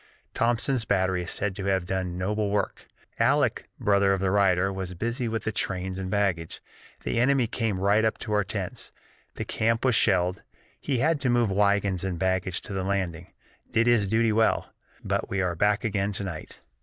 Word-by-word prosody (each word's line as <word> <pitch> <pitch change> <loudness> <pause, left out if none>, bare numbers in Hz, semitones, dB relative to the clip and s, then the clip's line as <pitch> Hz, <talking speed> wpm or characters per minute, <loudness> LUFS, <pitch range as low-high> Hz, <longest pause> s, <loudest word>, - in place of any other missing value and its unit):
Thomson's 120 +2 +1
Battery 95 -3 +1
is 90 - -6
said 100 -2 -2
to 100 - -4
have 95 -2 +1
done 90 -1 -2
noble 105 +3 -1
work. 100 -1 -2 0.3
Aleck - - +2
[brother 100 -1 +3
of 95 - 0
the 95 0 0
writer] 95 -1 +3
was 95 -1 -5
busy 120 +6 -2
with 115 0 -2
the 110 - -1
trains 95 -2 -2
and 95 -1 -4
baggage 95 -5 -1 0.4
the - - -1
enemy 130 0 +3
came 110 -4 -2
right 100 +3 +3
up 110 - +1
to 105 - -3
our 105 -1 +3
tents - - -5 0.4
the - - -4
camp 115 +2 0
was 130 - +4
shelled; 95 -4 +2 0.4
he 135 -3 -1
had 155 +5 +2
to 130 - +1
move 120 -4 +2
wagons 100 -2 +2
and 95 -2 -2
baggage 95 0 0
to - - -7
the 95 - -1
landing. 90 -3 -2 0.4
Did 115 +1 +2
his 115 -5 +3
duty 115 +1 +2
well. 110 +1 +1 0.3
But - - -1
we 100 - -1
are 90 -2 0
back 105 +6 +1
again 100 -2 -1
to 100 - -4
night. 90 -5 -7
100 Hz, 195 wpm, -26 LUFS, 95-110 Hz, 0.4 s, was